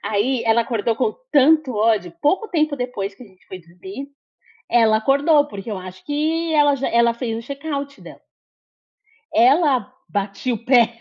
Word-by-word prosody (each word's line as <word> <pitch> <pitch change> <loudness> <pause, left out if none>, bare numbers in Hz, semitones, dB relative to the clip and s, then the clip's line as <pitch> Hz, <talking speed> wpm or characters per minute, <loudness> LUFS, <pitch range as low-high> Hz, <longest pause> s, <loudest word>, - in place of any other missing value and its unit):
Aí 230 +4 0
ela 230 +1 +3
acordou 230 -1 -2
com 430 - 0 0.2
tanto 295 0 +4
ódio 210 -5 +1
pouco 380 +9 +1
tempo 310 -4 0
depois 230 -6 -4
que - - -15
a - - -13
gente 190 -2 -25
foi 185 -1 -9
dormir, 190 +10 -10 0.6
ela 225 -2 +4
acordou, 285 +5 +3
porque 205 0 -8
eu 200 - -4
acho 185 0 -11
que 320 +3 -1
ela 290 -1 +4
já 270 - -2
ela 235 0 +3
fez 230 -2 -4
o 230 - -10
check-out 280 -1 -5
dela. - - -13 1.1
Ela 260 +1 +3 0.2
batia 200 +4 -3
o 230 - -9
pé, 235 -2 +3
245 Hz, 170 wpm, -20 LUFS, 215-285 Hz, 1.1 s, tanto